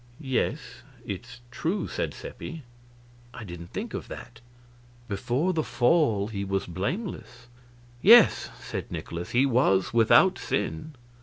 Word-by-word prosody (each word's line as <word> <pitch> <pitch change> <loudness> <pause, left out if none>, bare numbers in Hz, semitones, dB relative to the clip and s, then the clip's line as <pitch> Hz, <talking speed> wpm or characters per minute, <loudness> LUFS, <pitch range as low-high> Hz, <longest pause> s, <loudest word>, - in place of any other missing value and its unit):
"Yes 130 -4 -2 0.2
it's 120 +5 -7
true," 180 +11 -2
said - - -3
Seppi; 165 - -8 0.7
"I 115 - -7
didn't 85 -3 -8
think - - -6
of - - -5
that." - - -10 0.7
"Before 125 - -1
the 160 -2 0
Fall 120 -8 +2
he 100 -3 -4
was 95 0 -1
blameless." 120 - -5 0.6
"Yes," 230 +1 +7
said - - -6
Nikolaus, 85 +1 -5
"he 125 +3 +3
was 115 -8 +2
without 115 -2 +5
sin." 145 - -3
120 Hz, 125 wpm, -27 LUFS, 100-155 Hz, 0.7 s, Yes